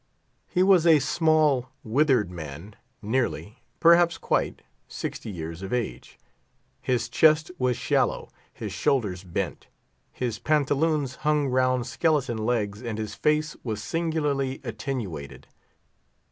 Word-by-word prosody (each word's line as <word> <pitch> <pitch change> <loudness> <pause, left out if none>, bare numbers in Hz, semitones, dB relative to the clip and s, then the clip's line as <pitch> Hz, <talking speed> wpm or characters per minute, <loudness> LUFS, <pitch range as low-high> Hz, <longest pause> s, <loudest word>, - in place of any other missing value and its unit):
He 180 -1 +2
was 185 -3 +5
a 160 -2 +8
small, 150 -3 +2
withered 125 - +2
man, 85 +4 -8 0.3
nearly, 115 0 -2 0.2
perhaps 170 0 +5
quite, - - -1 0.2
sixty - - -6
years 85 -2 -6
of 95 - -6
age. 120 - -4 0.6
His 125 -3 0
chest 155 +1 +3
was 125 -1 +1
shallow, - - 0 0.2
his - - -6
shoulders 100 -9 0
bent, 90 -3 -4 0.4
his 120 -4 -3
pantaloons 150 -2 +1
hung 150 -2 +1
round 130 -1 +2
skeleton 130 -3 0
legs, 110 -2 -1
and 115 -3 -4
his 110 -1 -4
face 150 +4 0
was 110 -3 -4
singularly 150 -5 -1
attenuated. 105 - -5
130 Hz, 120 wpm, -26 LUFS, 110-150 Hz, 0.6 s, a